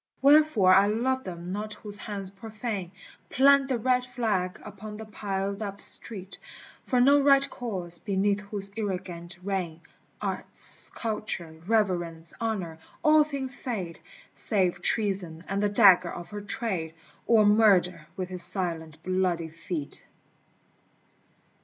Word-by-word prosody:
Wherefore 280 Hz, -10 st, +4 dB
I 195 Hz, +2 st, +5 dB
love 260 Hz, +5 st, -1 dB
them 175 Hz, -1 st, -8 dB
not 210 Hz, +2 st, -5 dB
whose 205 Hz, -1 st, -2 dB
hands 200 Hz, -3 st, -7 dB
profane 210 Hz, -3 st, -7 dB, 0.4 s
Plant 275 Hz, +1 st, +4 dB
the 260 Hz, -2 st, -1 dB
red 250 Hz, +2 st, 0 dB
flag 220 Hz, -8 st, -3 dB
upon 210 Hz, +1 st, -10 dB
the 220 Hz, -, -9 dB
piled 200 Hz, -1 st, -5 dB
up 200 Hz, -1 st, -6 dB
street 195 Hz, -4 st, +4 dB, 0.4 s
For 250 Hz, -, -1 dB
no 280 Hz, +3 st, +5 dB
right 275 Hz, 0 st, +4 dB
cause, 185 Hz, -8 st, -5 dB
beneath 200 Hz, 0 st, -1 dB
whose 200 Hz, -1 st, -1 dB
ignorant 180 Hz, -4 st, -3 dB
reign 180 Hz, -4 st, -4 dB, 0.4 s
Arts, -, -, +4 dB
Culture, 175 Hz, -8 st, -5 dB
Reverence, 175 Hz, -7 st, -1 dB
Honor, 190 Hz, -8 st, -4 dB, 0.2 s
all 305 Hz, -1 st, +5 dB
things 275 Hz, -3 st, -2 dB
fade, 190 Hz, -10 st, -6 dB, 0.3 s
Save 185 Hz, -, +4 dB
Treason 190 Hz, -7 st, 0 dB
and 195 Hz, +1 st, -3 dB
the 205 Hz, -, +1 dB
dagger 190 Hz, -4 st, +4 dB
of 175 Hz, -, -10 dB
her 205 Hz, 0 st, -7 dB
trade, 190 Hz, -6 st, -4 dB, 0.3 s
Or 220 Hz, -2 st, +4 dB
Murder 190 Hz, -6 st, +2 dB
with 185 Hz, -1 st, -5 dB
his 180 Hz, -1 st, +2 dB
silent 165 Hz, -4 st, +1 dB
bloody 180 Hz, -3 st, -2 dB
feet. 165 Hz, -2 st, -5 dB
200 Hz, 130 wpm, -26 LUFS, 180-225 Hz, 0.4 s, I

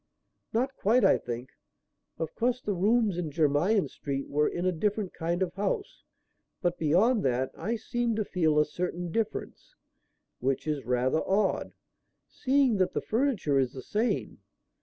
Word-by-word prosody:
"Not 260 Hz, +4 st, 0 dB
quite, 235 Hz, +5 st, +3 dB
I -, -, +5 dB
think. 120 Hz, +1 st, -6 dB, 0.7 s
Of 160 Hz, -1 st, -4 dB
course 245 Hz, +1 st, 0 dB
the 210 Hz, -5 st, -2 dB
rooms 205 Hz, 0 st, +2 dB
in 165 Hz, -3 st, -2 dB
Jermyn 160 Hz, +7 st, +2 dB
Street 140 Hz, -1 st, -4 dB
were 150 Hz, +1 st, +2 dB
in 175 Hz, -, -3 dB
a 185 Hz, -, +3 dB
different 200 Hz, +3 st, -1 dB
kind 170 Hz, +2 st, -1 dB
of 175 Hz, -2 st, -3 dB
house, 200 Hz, -, -3 dB, 0.6 s
but 175 Hz, 0 st, -1 dB
beyond 200 Hz, +10 st, +3 dB
that, 130 Hz, 0 st, +1 dB
I 215 Hz, +8 st, -2 dB
seem 235 Hz, +1 st, -1 dB
to 215 Hz, -1 st, -1 dB
feel 160 Hz, -6 st, +1 dB
a 150 Hz, -, +5 dB
certain 175 Hz, +2 st, -4 dB
difference; 225 Hz, +3 st, -4 dB, 0.6 s
which 135 Hz, +1 st, -1 dB
is 150 Hz, -4 st, -2 dB
rather 125 Hz, +4 st, +1 dB
odd, 200 Hz, +2 st, +1 dB, 0.5 s
seeing 265 Hz, -4 st, +2 dB
that 185 Hz, -1 st, +1 dB
the -, -, -1 dB
furniture 220 Hz, -, +1 dB
is 130 Hz, -2 st, 0 dB
the 130 Hz, -, -8 dB
same. 225 Hz, +3 st, -1 dB
180 Hz, 160 wpm, -28 LUFS, 150-220 Hz, 0.7 s, I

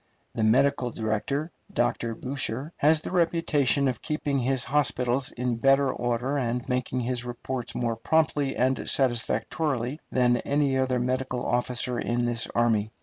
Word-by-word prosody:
The 110 Hz, -, -1 dB
medical 130 Hz, +3 st, +3 dB
director, 115 Hz, +9 st, -2 dB, 0.2 s
Dr. 120 Hz, -1 st, 0 dB
Boucher, 135 Hz, +3 st, -4 dB
has 155 Hz, +1 st, +4 dB
the -, -, -6 dB
reputation 165 Hz, -6 st, +2 dB
of 125 Hz, -4 st, -2 dB
keeping 150 Hz, -3 st, -1 dB
his 130 Hz, 0 st, 0 dB
hospitals 130 Hz, -3 st, +1 dB
in 125 Hz, -1 st, -2 dB
better 135 Hz, +2 st, +3 dB
order 120 Hz, +4 st, -1 dB
and 120 Hz, -1 st, -2 dB
making 125 Hz, 0 st, -1 dB
his 120 Hz, 0 st, -2 dB
reports 125 Hz, +1 st, -5 dB
more 115 Hz, -2 st, -1 dB
promptly 145 Hz, +1 st, +1 dB
and 130 Hz, +1 st, 0 dB
satisfactorily 130 Hz, +2 st, 0 dB
than 125 Hz, -1 st, +3 dB
any 140 Hz, +1 st, +1 dB
other 130 Hz, -1 st, +1 dB
medical 130 Hz, 0 st, -1 dB
officer 125 Hz, 0 st, 0 dB
in 120 Hz, +1 st, 0 dB
this 120 Hz, -1 st, 0 dB
army. 115 Hz, -3 st, +2 dB
125 Hz, 145 wpm, -26 LUFS, 120-140 Hz, 0.2 s, has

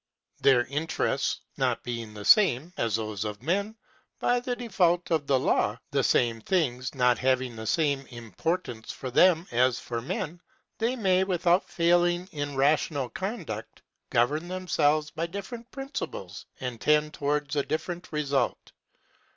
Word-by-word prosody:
Their 125 Hz, -3 st, +5 dB
interests 150 Hz, +4 st, -1 dB, 0.2 s
not -, -, 0 dB
being 115 Hz, -3 st, -5 dB
the 105 Hz, -1 st, -8 dB
same 175 Hz, -, +5 dB
(as 115 Hz, -, 0 dB
those 110 Hz, -2 st, -3 dB
of 105 Hz, +1 st, -6 dB
men) 200 Hz, +7 st, 0 dB, 0.4 s
by 245 Hz, 0 st, +2 dB
the 245 Hz, 0 st, -4 dB
fault 175 Hz, -3 st, +2 dB
of 155 Hz, -4 st, +1 dB
the 135 Hz, -, +4 dB
law, 105 Hz, -4 st, +1 dB
the 140 Hz, -2 st, +1 dB
same 115 Hz, -3 st, +2 dB
things 130 Hz, -, 0 dB
not 125 Hz, -2 st, +3 dB
having 130 Hz, -2 st, +1 dB
the 110 Hz, 0 st, -6 dB
same 140 Hz, -1 st, +1 dB
importance 120 Hz, -, -4 dB
for 130 Hz, -, -6 dB
them 170 Hz, +4 st, +5 dB
as 120 Hz, 0 st, +3 dB
for 120 Hz, -1 st, -4 dB
men, 170 Hz, +4 st, -4 dB, 0.4 s
they 235 Hz, +3 st, +1 dB
may, 190 Hz, -5 st, +3 dB
without 180 Hz, -1 st, +2 dB
failing 175 Hz, +1 st, +2 dB
in 145 Hz, -2 st, -4 dB
rational 140 Hz, -1 st, +1 dB
conduct, 175 Hz, -, -5 dB, 0.3 s
govern 150 Hz, +8 st, +1 dB
themselves 155 Hz, -5 st, +1 dB
by 165 Hz, +1 st, -3 dB
different 225 Hz, +6 st, -7 dB
principles, 270 Hz, +2 st, -6 dB
and 125 Hz, -4 st, -5 dB
tend 150 Hz, 0 st, +3 dB
towards 145 Hz, 0 st, -1 dB
a 145 Hz, -, +3 dB
different 175 Hz, +5 st, -4 dB
result. 140 Hz, -5 st, -1 dB
150 Hz, 145 wpm, -27 LUFS, 125-180 Hz, 0.4 s, Their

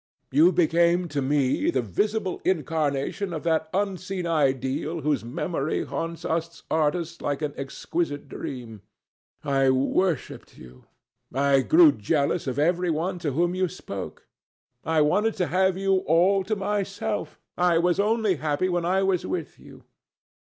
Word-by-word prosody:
You 160 Hz, +6 st, +5 dB
became 170 Hz, +1 st, +2 dB
to 145 Hz, -1 st, -2 dB
me 135 Hz, -1 st, +1 dB
the 130 Hz, -2 st, 0 dB
visible 200 Hz, -, -1 dB
incarnation 160 Hz, +2 st, -1 dB
of 160 Hz, -, -5 dB
that 160 Hz, -1 st, 0 dB
unseen 190 Hz, -1 st, -2 dB
ideal 145 Hz, 0 st, 0 dB
whose 150 Hz, -2 st, 0 dB
memory 155 Hz, +4 st, -2 dB
haunts 165 Hz, 0 st, -5 dB
us 165 Hz, +1 st, -3 dB
artists 160 Hz, +2 st, 0 dB
like 145 Hz, +1 st, -2 dB
an 145 Hz, -1 st, -2 dB
exquisite 145 Hz, +2 st, -3 dB
dream. 115 Hz, -6 st, -7 dB, 0.6 s
I 135 Hz, -1 st, +2 dB
worshipped 140 Hz, +5 st, -1 dB
you. 65 Hz, 0 st, -15 dB, 0.5 s
I 140 Hz, +1 st, +3 dB
grew 320 Hz, -, +6 dB
jealous 155 Hz, -, -1 dB
of 130 Hz, 0 st, -2 dB
every 175 Hz, +4 st, +1 dB
one 175 Hz, +3 st, -1 dB
to 150 Hz, -5 st, -2 dB
whom 175 Hz, +4 st, +1 dB
you 185 Hz, 0 st, +1 dB
spoke. 100 Hz, -, -8 dB, 0.6 s
I 160 Hz, 0 st, +2 dB
wanted 210 Hz, +9 st, +2 dB
to 180 Hz, -, 0 dB
have 190 Hz, 0 st, +2 dB
you 195 Hz, 0 st, +2 dB
all 185 Hz, +5 st, +4 dB
to 215 Hz, -, -1 dB
myself. 205 Hz, +1 st, -3 dB, 0.2 s
I 175 Hz, -1 st, +3 dB
was 175 Hz, +2 st, +2 dB
only 210 Hz, -3 st, +2 dB
happy 150 Hz, +5 st, 0 dB
when 175 Hz, -1 st, 0 dB
I 190 Hz, +2 st, +2 dB
was 190 Hz, -2 st, +1 dB
with 165 Hz, -6 st, -4 dB
you. -, -, -15 dB
165 Hz, 145 wpm, -25 LUFS, 145-185 Hz, 0.6 s, grew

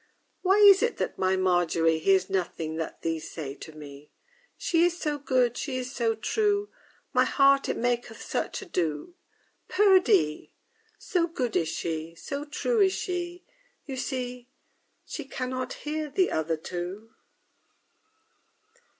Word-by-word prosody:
_ -, -, -37 dB
III -, -, -36 dB, 0.3 s
Why 380 Hz, +1 st, +4 dB
is 405 Hz, -2 st, +8 dB
it 475 Hz, 0 st, 0 dB
that -, -, -3 dB
my 190 Hz, 0 st, +2 dB
MARGERY 175 Hz, -3 st, +2 dB
Hears 190 Hz, +2 st, +3 dB
nothing 170 Hz, -4 st, -2 dB
that 160 Hz, -, -5 dB
these 165 Hz, -1 st, -2 dB
say 145 Hz, -4 st, -6 dB
to 160 Hz, -, -10 dB
me? 145 Hz, -1 st, -12 dB, 0.5 s
She 340 Hz, -9 st, +2 dB
is 350 Hz, 0 st, +2 dB
so 295 Hz, -1 st, -2 dB
good, 255 Hz, -3 st, +2 dB
she 265 Hz, -3 st, -3 dB
is 255 Hz, 0 st, -4 dB
so 230 Hz, -2 st, +1 dB
true, 415 Hz, -, 0 dB, 0.4 s
My -, -, +5 dB
heart 275 Hz, 0 st, +4 dB
it -, -, -1 dB
maketh 240 Hz, -1 st, -1 dB
such -, -, -3 dB
ado; 175 Hz, -, -2 dB, 0.6 s
_Perdie! 270 Hz, -, +3 dB, 0.4 s
So 345 Hz, -2 st, 0 dB
good 255 Hz, -9 st, -3 dB
is 160 Hz, -, +1 dB
she, 165 Hz, 0 st, -4 dB
so 280 Hz, -, -5 dB
true 445 Hz, +10 st, -1 dB
is 380 Hz, -1 st, +4 dB
she, 355 Hz, -2 st, -4 dB, 0.4 s
You 270 Hz, -, -5 dB
see, 250 Hz, -1 st, -4 dB, 0.6 s
She -, -, -6 dB
can 260 Hz, -1 st, -4 dB
not 255 Hz, 0 st, -3 dB
hear 305 Hz, 0 st, -2 dB
the 365 Hz, +6 st, +1 dB
other 160 Hz, +1 st, 0 dB
two. 180 Hz, +7 st, -6 dB
245 Hz, 150 wpm, -27 LUFS, -, 0.6 s, is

